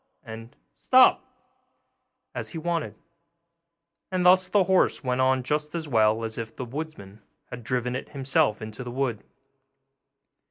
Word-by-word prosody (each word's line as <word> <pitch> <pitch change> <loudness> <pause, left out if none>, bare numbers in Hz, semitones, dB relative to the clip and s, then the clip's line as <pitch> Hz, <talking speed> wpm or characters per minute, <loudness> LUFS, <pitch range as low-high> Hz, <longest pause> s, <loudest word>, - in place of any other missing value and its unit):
and 115 +2 -10 0.2
'Stop!' 255 0 +4 1.1
as - - -5
he 165 - -8
wanted: 165 0 -3 1.2
and 185 -1 -1
thus 185 +1 +5
the 205 -2 +3
horse 185 -4 +2
went 125 0 0
on 130 0 +2
just 150 +4 -2
as 160 -2 -4
well 110 -3 +2
as 110 0 -4
if 115 0 -7
the 130 - -5
woodman 120 -7 -8 0.3
had 125 -1 -8
driven 125 +1 -2
it 130 - -6
himself 130 -6 0
into 110 +3 -7
the 125 - -7
wood. 125 -3 -2
130 Hz, 145 wpm, -25 LUFS, 115-160 Hz, 1.2 s, thus